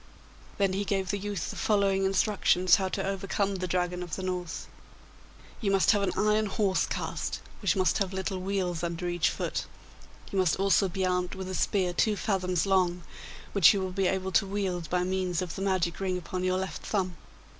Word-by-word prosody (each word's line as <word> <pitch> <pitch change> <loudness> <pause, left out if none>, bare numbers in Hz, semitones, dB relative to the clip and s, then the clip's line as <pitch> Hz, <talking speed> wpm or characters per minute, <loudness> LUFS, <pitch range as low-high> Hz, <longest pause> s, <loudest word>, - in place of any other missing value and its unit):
Then 195 -2 +2
he 195 +2 0
gave 195 -2 -1
the 205 - -2
youth 205 -3 -3
the - - -9
following 195 -2 +2
instructions 190 -2 +3
how 190 -1 -1
to - - -2
overcome 195 0 -1
the 185 0 -3
Dragon 180 0 -1
of 175 -3 -4
the 190 - -6
North: 180 -2 -3 1.0
'You 205 - 0
must 195 -1 +4
have 205 -2 +2
an 200 - +1
iron 215 0 +2
horse 195 -1 +1
cast, - - -3 0.2
which 200 - +2
must 185 -1 +2
have 195 -2 0
little 190 0 -3
wheels 185 -3 -1
under 170 +1 -3
each 175 -2 +1
foot. - - -3 0.7
You 195 - 0
must 180 -4 +3
also 195 0 +3
be 190 +1 -1
armed 180 0 0
with 190 -1 -6
a - - -4
spear 185 -1 +1
two 210 +4 +2
fathoms 185 -4 0
long, 180 -3 +2 0.5
which 200 0 +7
you - - 0
will 185 -1 -3
be 190 0 +1
able 190 0 -1
to 195 +2 +3
wield 185 -5 -2
by 180 0 +1
means 185 -2 -1
of 180 -3 -3
the - - -6
magic 185 -3 0
ring 185 -2 -1
upon 180 +1 -4
your 185 0 +1
left 190 -3 -4
thumb. 185 -4 -1
190 Hz, 200 wpm, -28 LUFS, 180-195 Hz, 1.0 s, which